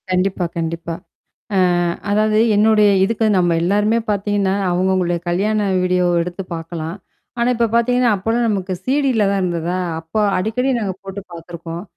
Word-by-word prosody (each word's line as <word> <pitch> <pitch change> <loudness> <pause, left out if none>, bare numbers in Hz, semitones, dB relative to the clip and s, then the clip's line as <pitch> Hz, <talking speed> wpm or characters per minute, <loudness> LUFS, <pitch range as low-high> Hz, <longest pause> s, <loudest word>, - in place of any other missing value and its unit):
கண்டிப்பா, 185 0 0
கண்டிப்பா. 165 0 -3 0.6
அ - - +2 0.5
அதாவது 215 +1 +2 0.2
என்னுடைய 210 0 +4
இதுக்கு 225 +2 0
நம்ம 175 -2 +2
எல்லாருமே 210 +5 +2
பார்த்தீங்கன்னா, 200 -1 0 0.2
அவுங்க 180 +2 +1
அவங்களுடைய 175 -2 0
கல்யாண 210 +5 +1 0.2
வீடியோ 180 0 +1 0.2
எடுத்து 180 +2 -5
பார்கலாம். 165 +1 -5 0.4
ஆனா, 235 +1 +2
இப்ப 230 0 +1
பார்த்தீங்கன்னா, 245 +1 +3
அப்போலாம் 225 +5 0
நமக்கு 190 -3 -1
சிடில 260 -5 +2
தான் 200 -1 0
இருந்ததா? 175 0 -2 0.2
அப்போ 165 +6 -5 0.2
அடிக்கடி 225 +7 0
நாங்க 195 -4 -2
போட்டு 195 +1 -7
பார்த்துருக்கோம். 170 0 -8
195 Hz, 140 wpm, -19 LUFS, 175-215 Hz, 0.6 s, என்னுடைய